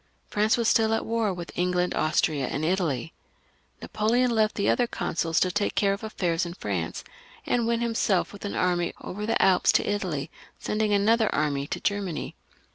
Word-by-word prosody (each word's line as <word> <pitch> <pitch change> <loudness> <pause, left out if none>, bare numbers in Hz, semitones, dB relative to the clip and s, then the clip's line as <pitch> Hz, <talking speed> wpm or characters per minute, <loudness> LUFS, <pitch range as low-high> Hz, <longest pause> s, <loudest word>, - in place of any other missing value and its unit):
France 215 +2 +2
was 235 -2 +1
still 225 -1 +3
at - - -3
war 225 -2 0
with 175 -2 -6
England, 180 0 0
Austria, 155 -3 +1
and 150 +5 -2
Italy. 165 -5 -1 0.7
Napoleon 235 +4 +1
left 220 -2 +2
the 200 - 0
other 245 - +2
consuls 165 -6 -1
to 185 - +2
take 205 +3 -1
care 200 -1 +2
of 200 - -7
affairs 175 -6 -1
in 170 0 -5
France, 90 - -3 0.4
and 235 -2 +1
went 235 0 +1
himself 225 -6 0
with 205 - -11
an 205 - -4
army 175 -1 0
over 210 +3 -5
the 225 - +1
Alps 185 -2 +4
to - - +2
Italy, 170 -8 -2 0.3
sending 215 0 -1
another 215 +2 +3
army 145 -2 0
to - - -4
Germany. 200 -5 -2
195 Hz, 180 wpm, -26 LUFS, 170-220 Hz, 0.7 s, Alps